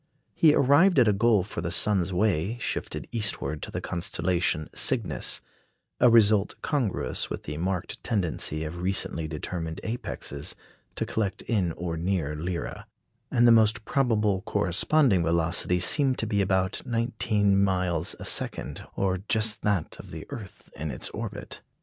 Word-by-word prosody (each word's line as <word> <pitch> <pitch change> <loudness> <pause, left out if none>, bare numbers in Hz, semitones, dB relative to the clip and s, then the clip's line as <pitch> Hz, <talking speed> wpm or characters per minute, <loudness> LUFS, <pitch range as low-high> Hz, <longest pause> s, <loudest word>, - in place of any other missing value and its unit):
He 155 -2 +5
arrived 145 +7 +4
at 125 -4 +5
a 105 - +4
goal 110 -1 +3
for 95 - -6
the 85 - -3
sun's 95 0 +2
way 100 +2 0
shifted - - -4
eastward 105 -9 -2
to - - -6
the - - -4
constellation 85 -2 -1
Cygnus - - +3 0.6
a 125 - +6
result 110 -3 +4
congruous 115 - -1
with - - -5
the 75 - -6
marked 90 +2 -3
tendency 85 -6 -1
of 85 +3 -6
recently 90 -3 -1
determined 80 +1 -5
apexes 110 - -4 0.4
to - - -1
collect 105 -4 -3
in 100 -8 0
or 85 -1 -4
near 85 -4 -1
Lyra; 85 +3 -5 0.4
and 120 -2 +3
the - - +7
most 110 -1 +3
probable 105 -7 +1
corresponding 95 - +2
velocity 85 +2 +1
seemed 135 - +4
to - - -1
be 105 -2 0
about 95 0 0
nineteen 110 -4 +1
miles 90 -4 0
a - - -7
second, - - -3
or 95 -1 0
just 110 -1 +2
that 100 -6 -1
of - - -11
the 80 -1 -8
earth 105 -5 -10
in 80 +1 -5
its 65 - -4
orbit. - - -7
95 Hz, 150 wpm, -26 LUFS, 85-110 Hz, 0.6 s, the